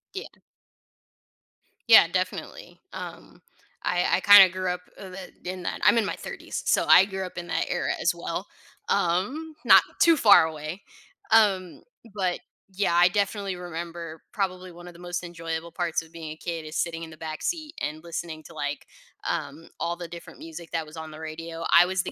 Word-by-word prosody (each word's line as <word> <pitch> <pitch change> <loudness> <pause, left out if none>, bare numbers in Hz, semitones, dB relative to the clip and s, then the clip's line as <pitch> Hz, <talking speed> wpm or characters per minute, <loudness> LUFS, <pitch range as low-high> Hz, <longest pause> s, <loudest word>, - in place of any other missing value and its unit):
Yeah. 385 - -4 1.6
Yeah, - - +9
definitely. - - -4
Um, - - -9 0.4
I 180 0 +1
I 190 - -4
kinda 205 -2 +9
grew 185 0 -2
up, 180 0 -4 0.2
uh, 195 - -8 0.4
in 180 - -3
in 185 - -8
that. - - -3
I'm - - +6
in 225 - +3
my - - -2
30s, - - -6
so, - - +3
I 190 - +8
grew 190 -1 -4
up 180 - -10
in 175 - -5
that - - 0
era - - -1
as - - +2
well. - - -5 0.4
Um, 205 - 0
not - - +8 0.2
too 335 -1 +6
far 205 - +7
away. 160 +4 -6 0.5
Um, 195 -5 +3 0.3
but 185 -3 -1 0.3
yeah, 190 -3 +1
I 175 +1 +7
definitely 200 -1 -1
remember 170 -2 -7
probably 185 -4 -3
one 175 +1 -12
of 175 - -10
the 170 - -16
most 175 0 -4
enjoyable 165 -1 -5
parts 175 -3 -1
of 160 0 -16
being 160 -2 -7
a - - -7
kid 165 -2 -5
is 155 - -8
sitting 165 -1 -2
in 165 - -8
the 155 - -13
backseat 295 - -4
and 155 +2 -4
listening 165 -2 -6
to 165 +1 -14
like, 145 -1 -4 0.4
um, 145 +3 -4
all 170 +1 -1
the 175 0 -7
different 170 0 -11
music 165 +1 -10
that 165 -1 -2
was 155 +1 -13
on 160 -1 -7
the 155 - -10
radio. 165 +1 -6
I 175 - +8
was 185 0 0
the - - -5
175 Hz, 190 wpm, -26 LUFS, 165-185 Hz, 1.6 s, Yeah